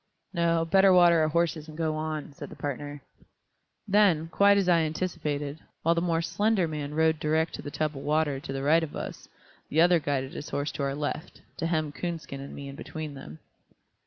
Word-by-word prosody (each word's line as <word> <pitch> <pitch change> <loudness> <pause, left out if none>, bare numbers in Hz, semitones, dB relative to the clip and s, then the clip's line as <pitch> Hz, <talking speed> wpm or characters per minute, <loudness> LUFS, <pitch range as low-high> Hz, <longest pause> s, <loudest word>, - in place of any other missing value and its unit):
"No, 170 -1 +2
better 190 +3 +5
water 175 -2 +6
our 155 - +3
horses 160 -1 0
and 155 0 -10
go 160 -2 0
on," 155 -2 -4
said - - -8
the - - -10
partner. 145 0 -5 0.8
Then, 190 -6 +3
quite 200 +3 +5
as 195 -2 +1
I 175 -2 +5
anticipated, 155 -3 -2 0.2
while 165 - +4
the 170 - 0
more 170 -1 0
slender 205 +1 +1
man 150 -2 -5
rode 160 0 +3
direct 160 +1 +1
to - - -6
the - - -6
tub 155 0 -2
of 135 - -6
water, 150 -2 +1
to 135 - -7
the 135 0 -3
right 160 +4 +4
of 160 -3 -5
us, - - -7 0.4
the 155 - +1
other 175 0 +6
guided 140 -3 -2
his 145 - -7
horse 145 +1 -2
to - - -6
our 140 0 -1
left, 150 +2 -5
to 165 - -1
hem 155 -3 0
Coonskin 160 -3 -5
and 140 - -8
me 140 - -7
in 140 - -8
between 155 0 -6
them. 80 - -10
155 Hz, 210 wpm, -28 LUFS, 145-170 Hz, 0.8 s, water